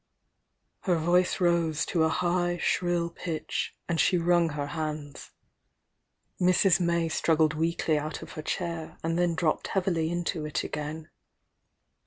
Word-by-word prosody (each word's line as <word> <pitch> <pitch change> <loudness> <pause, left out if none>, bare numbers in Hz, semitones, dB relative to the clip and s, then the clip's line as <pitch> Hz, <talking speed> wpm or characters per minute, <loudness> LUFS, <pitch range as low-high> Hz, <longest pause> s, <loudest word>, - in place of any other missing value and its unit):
Her 180 -3 +1
voice 175 +3 +2
rose 170 -3 +2
to 170 - 0
a 160 - +3
high 175 +1 0
shrill 175 -1 0
pitch, 165 -2 -4
and 170 -1 -1
she 180 - +4
wrunK 170 -2 +2
her 145 -1 -2
hands. 155 -3 -5 0.6
* - - -25
Mrs. 185 +1 +4
May 170 -1 +1
struggled 160 -1 +2
weakly 160 -1 0
out 155 +1 -5
of - - -10
her 155 - -6
chair, 165 0 -4
and 165 +1 0
then 175 -1 +1
dropped 160 -3 0
heavily 175 -4 0
into 175 -1 -2
it 150 -1 -2
again. 155 +1 -5
170 Hz, 145 wpm, -28 LUFS, 160-175 Hz, 0.6 s, she